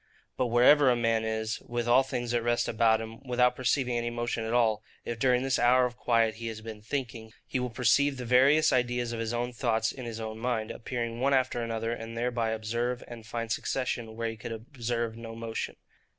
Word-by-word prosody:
But 130 - 0
wherever 130 +4 +6
a 125 - +4
man 115 -1 +1
is, 110 0 -2
with 120 0 -3
all 120 +2 +6
things 120 -2 -3
at 120 - +2
rest 120 +1 +1
about 110 0 +3
him, 115 +2 -8
without 125 -1 +2
perceiving 125 -1 +1
any 120 0 -2
motion 120 -1 -2
at 110 - -3
all,—if 110 0 -1
during 125 0 +3
this 135 -1 +1
hour 125 +1 +5
of 125 -1 -4
quiet 115 -2 +2
he 115 0 -5
has 110 -1 -5
been 110 -1 -8
thinking, 115 -2 -5
he 130 - -2
will 125 0 -2
perceive 130 +4 +2
the 125 - -5
various 135 +6 +5
ideas 120 -1 0
of 115 - -4
his 115 0 -2
own 120 +1 -2
thoughts 115 -2 0
in 130 -2 -8
his 115 -1 -5
own 110 0 -5
mind, 115 -2 -1
appearing 115 -1 -4
one 135 +2 +3
after 130 -2 +1
another, 115 0 -2
and 115 0 -6
thereby 120 -1 0
observe 115 +3 -2
and 115 -2 -10
find 115 0 -4
succession 120 -2 -2
where 115 0 -2
he 115 - -10
could 110 +2 -7
observe 115 -1 -3
no 115 0 -8
motion. 115 -1 -4
120 Hz, 210 wpm, -29 LUFS, 115-125 Hz, -, wherever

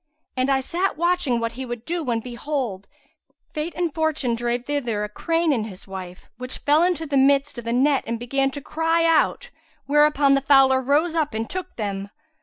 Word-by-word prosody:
And 255 +1 0
I 270 -1 +2
sat 355 +7 -1
watching 340 -8 +1
what 230 0 -2
he 255 +3 -7
would 240 -2 -6
do 340 0 -2
when 235 -4 -1
behold, 240 -5 -4 0.7
fate 310 +2 -4
and 340 -2 -1
fortune 310 -6 0
drave 240 +1 -2
thither 245 -8 -2
a 210 - -4
crane 330 +7 0
and 220 -4 -1
his 190 -2 -11
wife, 185 -1 -9
which 255 +1 -4
fell 295 +2 +3
into 345 -2 +1
the 285 -2 0
midst 275 0 +3
of 235 - -10
the 230 - -2
net 270 +3 +2
and 230 0 -2
began 270 +3 0
to 285 +1 -7
cry 325 +3 0
out; 330 -1 +2 0.3
whereupon 295 -1 +4
the 275 - +3
fowler 270 -1 +5
rose 295 +6 +1
up 305 -8 -1
and 225 +1 -2
took 370 0 -5
them. 200 -2 -4
275 Hz, 200 wpm, -23 LUFS, 235-310 Hz, 0.7 s, fowler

